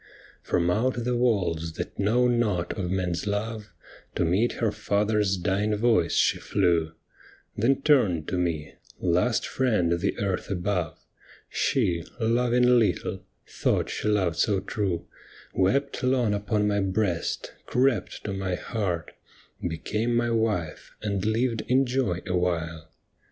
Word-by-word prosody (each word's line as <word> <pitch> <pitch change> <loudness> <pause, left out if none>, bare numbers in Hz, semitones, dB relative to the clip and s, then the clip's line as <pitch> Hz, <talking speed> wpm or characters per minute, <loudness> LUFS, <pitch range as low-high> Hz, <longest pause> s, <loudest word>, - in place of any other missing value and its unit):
From 85 0 +1
out 120 +4 0
the 125 +1 0
walls 90 -10 0
that - - -6
know 115 +5 +3
not 110 -8 0
of 90 -3 -3
men's 90 0 -1
love, 105 +1 -3 0.4
To 85 - +1
meet 100 +8 +2
her 115 -3 0
father's 105 -1 +1
dying 100 +4 0
voice 105 -6 +2
she - - +3
flew, 80 -2 +1 0.6
Then 135 +5 +1
turned 100 - +3
to 90 - -1
me 80 -4 -2 0.2
— - - -23
last 90 +7 +1
friend 110 -10 +1
the - - -1
earth 100 -2 -2
above 90 -3 -1 0.3
— - - -24
She, 90 -10 +1 0.2
loving 125 +1 +3
little, 110 - -1 0.2
thought - - 0
she - - -3
loved 95 -6 +1
so 100 -3 +2
true, 95 -3 -2 0.5
Wept 135 +10 +1
long 125 -4 +2
upon 105 +1 0
my 100 0 +1
breast, 95 -3 -1
crept 125 -5 +1
to 100 - -3
my 95 -2 -2
heart, 90 -6 -3 0.5
Became 105 +8 -1
my 120 0 +1
wife, 110 -8 -1
and 100 -3 -1
lived 115 +1 +1
in 130 +2 +3
joy 125 -9 0
a 90 - -1
while. 80 -3 -2
105 Hz, 140 wpm, -26 LUFS, 90-115 Hz, 0.6 s, know